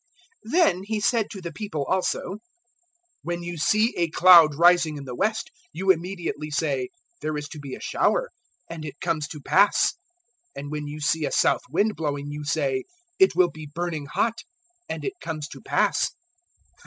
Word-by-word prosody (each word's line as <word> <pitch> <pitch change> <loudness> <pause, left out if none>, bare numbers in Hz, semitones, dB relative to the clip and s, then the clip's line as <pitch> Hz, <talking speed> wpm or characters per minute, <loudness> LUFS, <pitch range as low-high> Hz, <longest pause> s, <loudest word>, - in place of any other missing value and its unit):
012:054 - - -7
Then 315 - +3
He 215 0 -2
said 220 0 +1
to 195 - -8
the 170 -2 -6
people 165 -5 -4
also, 190 +2 -1 0.8
"When 175 0 -4
you 175 0 -5
see 215 +8 +2
a 170 -1 +1
cloud 165 -2 +7
rising 170 -1 +4
in 140 - -8
the 125 - -6
west, 220 - -1 0.2
you 190 +3 +3
immediately 170 -4 -3
say, 375 - -1 0.3
`There 155 -1 -2
is 145 0 -5
to 155 - -9
be 140 -2 -7
a - - -11
shower;' - - 0 0.4
and 165 -2 -7
it 145 -2 -8
comes 165 -4 -1
to 150 - -8
pass. 200 +7 +4 0.7
012:055 - - -4
And 145 - -7
when 150 -1 -4
you 150 +1 -7
see 155 +2 +1
a - - -2
south - - +3
wind 205 +9 +1
blowing, 145 -2 -3
you 150 0 -6
say, 140 -4 -1 0.4
`It 380 - +6
will 180 -2 +4
be 155 -1 -10
burning 165 -4 -3
hot;' 230 +10 -1 0.5
and - - -4
it 400 - -2
comes 155 -2 -4
to - - -11
pass. - - +1
165 Hz, 185 wpm, -25 LUFS, 150-190 Hz, 0.8 s, cloud